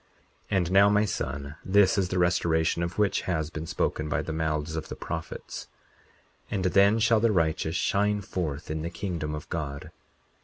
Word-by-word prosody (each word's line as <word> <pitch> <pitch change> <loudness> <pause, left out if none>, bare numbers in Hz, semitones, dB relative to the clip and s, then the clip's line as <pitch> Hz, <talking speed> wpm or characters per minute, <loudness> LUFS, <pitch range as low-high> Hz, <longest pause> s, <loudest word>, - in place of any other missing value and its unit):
40:24 95 - +1
And 90 -2 0
now, 100 +1 +6
my 105 +1 +3
son, 70 -6 -4
this 95 0 +4
is 95 -3 +1
the 90 - -1
restoration 85 -2 +2
of 85 +1 -3
which 105 -2 +2
has 80 -3 -1
been 80 -1 -5
spoken 75 -3 -1
by - - 0
the 80 - -4
mouths 80 0 -1
of 80 - -4
the - - -5
prophets— 80 -1 -6 0.8
40:25 - - -4
And 95 -2 -1
then 100 +2 +5
shall 115 0 +4
the 115 +1 +3
righteous 80 -3 0
shine 105 +2 +1
forth 80 -7 -4
in 80 0 -2
the 85 - -3
kingdom 85 -4 -3
of 75 - -8
God. 70 -4 -4
85 Hz, 190 wpm, -27 LUFS, 80-100 Hz, 0.8 s, now